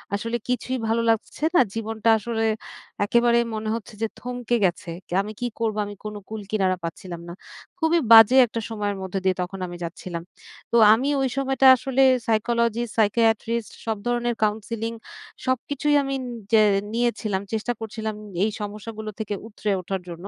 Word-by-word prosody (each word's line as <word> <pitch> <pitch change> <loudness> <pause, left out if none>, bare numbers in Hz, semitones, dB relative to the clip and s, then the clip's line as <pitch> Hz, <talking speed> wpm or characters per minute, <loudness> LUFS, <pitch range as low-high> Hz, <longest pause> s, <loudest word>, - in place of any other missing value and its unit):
আসলে 230 +3 -2
কিছুই 255 +1 -1
ভালো 225 +1 +1
লাগছে 225 +6 -1
না, - - +7
জীবনটা 225 0 -1
আসলে 225 +1 -2 0.6
একেবারে 235 +2 +3 0.2
মনে 215 0 -3
হচ্ছে 230 0 -7
যে 225 - +1
থমকে 245 -1 -2
গেছে। 175 -1 -2 0.2
কে - - -8
আমি 210 +2 -6
কি 245 - -2
করবো?" 220 -2 -1
আমি 205 0 -8
কোনো 210 0 -5
কুল 220 -1 -5
কিনারা 190 -3 +1
পাচ্ছিলাম 170 +1 -6
না। - - -6 0.5
খুবই 330 +1 +3
বাজে 225 +2 +9
একটা 230 0 -4
সময়ের 205 -2 -2
মধ্যে 190 +1 -3
দিয়ে 190 -1 +3
তখন 185 +2 -5
আমি 175 0 -8
যাচ্ছিলাম। 170 0 -6 0.5
তো - - 0 0.2
আমি 255 +6 +1
ওই 265 - +1
সময়টা 270 0 +1
আসলে 265 +1 0 0.3
সাইকোলজিস্ট, 235 +1 +1
সাইকিয়াট্রিস্ট, 225 +1 +1
সব 220 -1 -1
ধরনের 240 0 0
কাউন্সেলিং, 220 +2 -1 0.5
সবকিছুই 285 +3 0
আমি 275 0 -3 0.4
যে 220 - +7 0.3
নিয়েছিলাম। 225 -4 0
চেষ্টা 220 +2 -1
করছিলাম 220 -1 -4 0.3
এই 215 - +2
সমস্যাগুলো 215 +1 -6
থেকে 210 -1 -3 0.2
উতরে 210 -1 -3
ওঠার 190 +1 -3
জন্য। - - -4
225 Hz, 160 wpm, -24 LUFS, 210-240 Hz, 0.6 s, বাজে